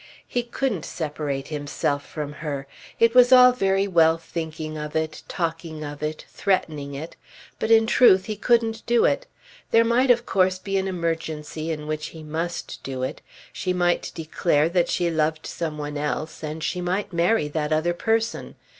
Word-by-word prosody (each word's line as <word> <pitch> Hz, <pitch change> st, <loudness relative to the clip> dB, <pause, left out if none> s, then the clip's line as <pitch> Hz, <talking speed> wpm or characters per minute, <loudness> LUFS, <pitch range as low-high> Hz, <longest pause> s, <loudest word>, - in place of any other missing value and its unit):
He 245 Hz, -, 0 dB
couldn't 235 Hz, -, -2 dB
separate 150 Hz, -3 st, -4 dB
himself 145 Hz, -1 st, -2 dB
from 150 Hz, -1 st, -6 dB
her. 145 Hz, -3 st, -5 dB, 0.3 s
It 230 Hz, 0 st, +5 dB
was 250 Hz, 0 st, +7 dB
all 250 Hz, -1 st, +9 dB
very 195 Hz, -4 st, +1 dB
well 165 Hz, -3 st, +4 dB
thinking 160 Hz, -1 st, -5 dB
of 150 Hz, 0 st, -6 dB
it, 160 Hz, 0 st, -2 dB
talking 165 Hz, -2 st, -3 dB
of 145 Hz, 0 st, -7 dB
it, 155 Hz, 0 st, -4 dB
threatening 150 Hz, -8 st, -1 dB
it; 155 Hz, +4 st, -7 dB, 0.4 s
but 220 Hz, -, -1 dB
in 225 Hz, 0 st, +6 dB
truth 205 Hz, -5 st, +5 dB
he 215 Hz, -, -3 dB
couldn't 225 Hz, 0 st, +1 dB
do 235 Hz, 0 st, +4 dB
it. -, -, +1 dB, 0.4 s
There 230 Hz, 0 st, +5 dB
might 245 Hz, +3 st, +3 dB
of 240 Hz, -1 st, +4 dB
course 185 Hz, -1 st, +2 dB
be 195 Hz, +1 st, -4 dB
an 190 Hz, -, -2 dB
emergency 165 Hz, -3 st, -3 dB
in 150 Hz, -2 st, -3 dB
which 155 Hz, 0 st, -3 dB
he 160 Hz, -1 st, -10 dB
must 165 Hz, +3 st, -4 dB
do 130 Hz, -1 st, -4 dB
it. 130 Hz, -, -4 dB, 0.3 s
She 185 Hz, -, -1 dB
might 175 Hz, -1 st, +1 dB
declare 160 Hz, -1 st, +1 dB
that 175 Hz, 0 st, +1 dB
she 175 Hz, -1 st, +1 dB
loved 155 Hz, 0 st, 0 dB
some 160 Hz, -3 st, -4 dB
one 145 Hz, 0 st, -4 dB
else 150 Hz, +1 st, -3 dB
and 155 Hz, 0 st, -5 dB
she 180 Hz, +2 st, -2 dB
might 185 Hz, +2 st, -2 dB
marry 170 Hz, +1 st, +2 dB
that 150 Hz, 0 st, -2 dB
other 160 Hz, +3 st, +2 dB
person. 225 Hz, +5 st, -1 dB
165 Hz, 175 wpm, -24 LUFS, 155-195 Hz, 0.4 s, all